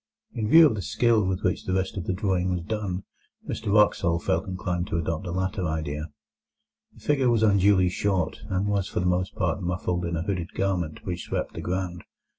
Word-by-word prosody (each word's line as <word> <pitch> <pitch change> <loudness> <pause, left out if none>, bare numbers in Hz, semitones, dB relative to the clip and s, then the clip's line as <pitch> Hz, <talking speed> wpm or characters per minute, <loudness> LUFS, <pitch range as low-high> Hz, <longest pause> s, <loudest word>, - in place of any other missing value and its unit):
In 110 -2 -2
view 165 +4 +9
of 145 - +4
the 105 - -3
skill 110 +2 +2
with 95 0 -1
which 90 - 0
the 90 - -1
rest 95 0 -1
of 95 -4 -4
the - - 0
drawing 95 -2 0
was 90 -2 -1
done, 100 -1 -3 0.4
Mr 100 - -3
Wraxall 100 -5 +4
felt 85 0 -1
inclined 90 -1 -2
to 85 - -2
adopt 80 +3 -2
the 85 - -4
latter 95 +1 -1
idea. 80 0 -3 0.9
The - - -17
figure 135 -4 +2
was 115 -2 +3
unduly 100 -3 +4
short, 90 -2 -1
and 95 +1 0
was 100 -2 0
for - - -2
the 90 - -1
most 90 +1 0
part 90 +1 -1
muffled 90 0 -1
in 85 0 -2
a 80 - -2
hooded 90 -3 -3
garment 90 -5 -2
which 90 -2 -4
swept - - -3
the - - -6
ground. 90 -1 -3
95 Hz, 210 wpm, -26 LUFS, 85-100 Hz, 0.9 s, view